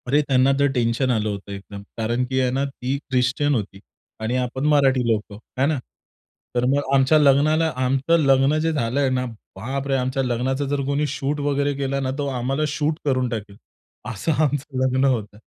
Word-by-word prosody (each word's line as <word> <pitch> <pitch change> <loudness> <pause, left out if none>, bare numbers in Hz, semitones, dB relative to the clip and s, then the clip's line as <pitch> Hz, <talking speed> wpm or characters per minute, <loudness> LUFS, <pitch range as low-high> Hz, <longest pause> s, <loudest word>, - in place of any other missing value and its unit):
अरे, 145 +4 +3
त्यांना 130 0 +4
तर 140 - +4
टेन्शन 120 +2 +1
आलं 110 -3 0
होतं 100 -1 -6
एकदम 100 0 -8 0.2
कारण, 120 +2 0
की 130 +1 -1
आहे 130 -1 +1
ना, 135 +2 0
ती 135 0 -3
ख्रिश्चन 135 +2 0
होती 105 -4 -4 0.4
आणि 110 +3 -1
आपण 130 +2 -2
मराठी 135 -4 +3
लोकं, 105 -2 -2 0.2
आहे 135 +2 +3
ना. 155 -1 0 0.8
तर 120 0 +2
मग 140 0 0
आमच्या 135 +3 +5
लग्नाला, 150 +3 +4
आमचं 135 +5 +2
लग्न 135 +2 +4
जे 165 +1 +1
झालंय 135 -1 0
ना 130 0 0 0.3
बापरे, 135 +3 -2
आमच्या 130 +1 0
लग्नाचा 130 +3 -1
जर 140 0 -1
कोणी 140 +2 0
शूट 145 +1 -2
वगैरे 145 0 0
केला 140 0 -2
ना, 130 -1 -1
तर 140 -1 -1
आम्हाला 135 +5 -1
शूट 150 +1 -1
करून 130 -3 +1
टाकेल 105 -3 -6 0.6
असं 110 +10 -1
आमचं 145 -2 -2
लग्न 130 +1 +1
होतं. 110 -6 -1
135 Hz, 180 wpm, -22 LUFS, 125-140 Hz, 0.8 s, आमच्या